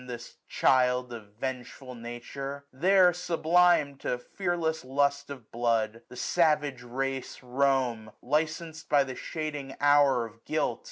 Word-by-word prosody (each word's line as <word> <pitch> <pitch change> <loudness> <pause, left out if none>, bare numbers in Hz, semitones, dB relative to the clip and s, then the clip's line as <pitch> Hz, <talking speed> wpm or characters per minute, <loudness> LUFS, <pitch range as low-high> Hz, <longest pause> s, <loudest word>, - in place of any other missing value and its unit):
This 120 -1 -8
child 125 -1 +2
of 105 -3 -11
vengeful 130 0 -5
Nature! 125 +4 -7
There, 180 +5 +5
sublim'd 170 -4 +2
To 125 - -2
fearless 165 +3 -2
lust 140 +2 0
of 130 -6 -10
blood, 115 -1 0
the - - -11
savage 150 -5 +1
race 135 +2 -4
Roam, 125 -4 0
licensed 160 +3 -2
by 145 -1 +5
the 130 -1 -7
shading 145 -4 -5
hour 145 -4 +4
of 115 +1 -14
guilt. 155 0 -1
135 Hz, 125 wpm, -28 LUFS, 125-155 Hz, -, There